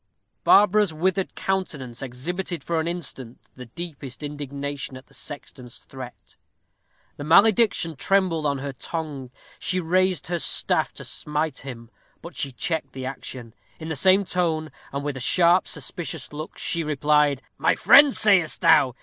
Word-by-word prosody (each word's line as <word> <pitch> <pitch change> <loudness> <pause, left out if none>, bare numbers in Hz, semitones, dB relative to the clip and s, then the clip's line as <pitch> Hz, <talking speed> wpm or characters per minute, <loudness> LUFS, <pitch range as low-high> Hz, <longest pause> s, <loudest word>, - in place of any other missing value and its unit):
Barbara's 205 -1 +5
withered 185 +4 -1
countenance 150 -11 -3
exhibited 160 +6 -4
for 170 -1 -1
an 160 - -2
instant 135 -8 -5 0.2
the 125 -1 -10
deepest 140 -1 -7
indignation 140 -2 -5
at 130 - -14
the - - -24
sexton's 125 -4 -8
threat. 125 -8 -12 0.8
The - - -6
malediction 200 0 +4
trembled 180 -2 +1
on 140 -1 0
her 140 0 -5
tongue; 145 -3 -5 0.3
she 185 - 0
raised 185 -1 +1
her 175 0 -2
staff - - +2
to - - -9
smite 150 -1 -2
him, 120 -3 -9 0.3
but 170 - -10
she 140 - -1
checked 160 +7 -2
the 130 -1 -6
action. 130 -3 -7 0.3
In 160 0 -6
the 160 - -2
same 190 +6 +4
tone, 160 -4 -1 0.2
and 140 +1 -4
with 145 -2 -3
a - - -5
sharp, 175 +7 +4
suspicious 165 -3 -6
look, 155 +2 -7
she 170 -1 -1
replied, 150 -2 +2 0.2
"My - - +3
friend, 285 -1 +7
sayest 195 -7 +3
thou? 130 -3 +5
155 Hz, 150 wpm, -24 LUFS, 135-175 Hz, 0.8 s, friend